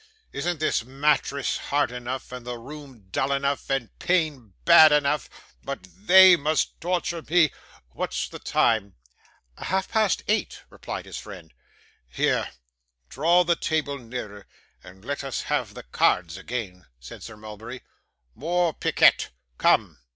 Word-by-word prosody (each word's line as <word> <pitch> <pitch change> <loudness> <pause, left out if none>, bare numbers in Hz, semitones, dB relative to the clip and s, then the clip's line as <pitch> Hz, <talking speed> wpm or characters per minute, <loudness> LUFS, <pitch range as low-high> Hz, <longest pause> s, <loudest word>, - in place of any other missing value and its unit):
'Isn't 175 -2 -2
this 155 -6 0
mattress 140 +1 0
hard 145 -2 0
enough, 125 +1 -6
and 125 -1 -7
the 120 0 -5
room 135 -3 -12
dull 135 +7 0
enough, 140 0 -1
and 135 -4 -1
pain 150 - -1
bad 155 -1 +8
enough, 150 -1 +1 0.3
but 95 - -6 0.2
THEY 190 0 +9
must 155 0 -1
torture 175 -1 -2
me? 160 -1 +3 0.4
What's 65 +1 -3
the - - -10
time?' 105 -4 +1 0.6
'Half 190 +1 -2
past 220 -4 +1
eight,' 215 -1 -1
replied - - -7
his - - -7
friend. 90 -6 -11 0.6
'Here, - - 0 0.6
draw 170 +6 +3
the 170 0 +2
table 150 -4 -2
nearer, 115 -5 -8 0.4
and 95 +3 -15
let 140 +1 -3
us 135 -2 -4
have - - -2
the - - -9
cards 85 +7 +1
again,' 95 -3 -6
said - - -11
Sir 115 -2 -10
Mulberry. 110 +4 -9 0.5
'More 170 +3 0
piquet. - - +3 0.3
Come. - - +2
135 Hz, 135 wpm, -25 LUFS, 110-155 Hz, 0.6 s, THEY